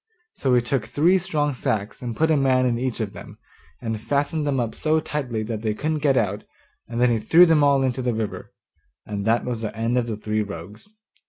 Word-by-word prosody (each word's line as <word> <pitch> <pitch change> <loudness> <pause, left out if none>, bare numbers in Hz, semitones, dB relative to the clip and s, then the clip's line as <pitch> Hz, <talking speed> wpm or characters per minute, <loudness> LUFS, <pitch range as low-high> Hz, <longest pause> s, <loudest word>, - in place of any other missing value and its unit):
So 130 -2 +1
he 120 - +4
took 120 -2 -1
three 165 +10 +3
strong 150 -5 -1
sacks 110 -1 -2
and 120 -2 -4
put 160 0 +2
a - - +4
man 130 -2 +3
in 120 -2 +1
each 130 -1 -2
of 105 -3 -3
them, - - -11 0.4
and 115 -3 -4
fastened 145 +4 -1
them 135 -2 +1
up 115 -2 -2
so 155 0 +1
tightly 125 -8 -3
that 110 -1 -4
they 110 -2 -1
couldn't 155 +5 -1
get 140 -3 +2
out, 105 -2 0 0.4
and 115 0 -4
then 125 0 +4
he 115 - +1
threw 170 +10 +6
them 160 -3 +4
all 140 -1 +4
into 130 0 -1
the 125 -2 -1
river; 105 -4 -4 0.5
and 100 -1 -4
that 115 +1 +2
was 120 -3 -3
the 110 0 -5
end 115 +2 +1
of 120 - -2
the 110 -2 -3
three 110 0 -1
rogues. 105 - -8
125 Hz, 230 wpm, -23 LUFS, 110-145 Hz, 0.5 s, threw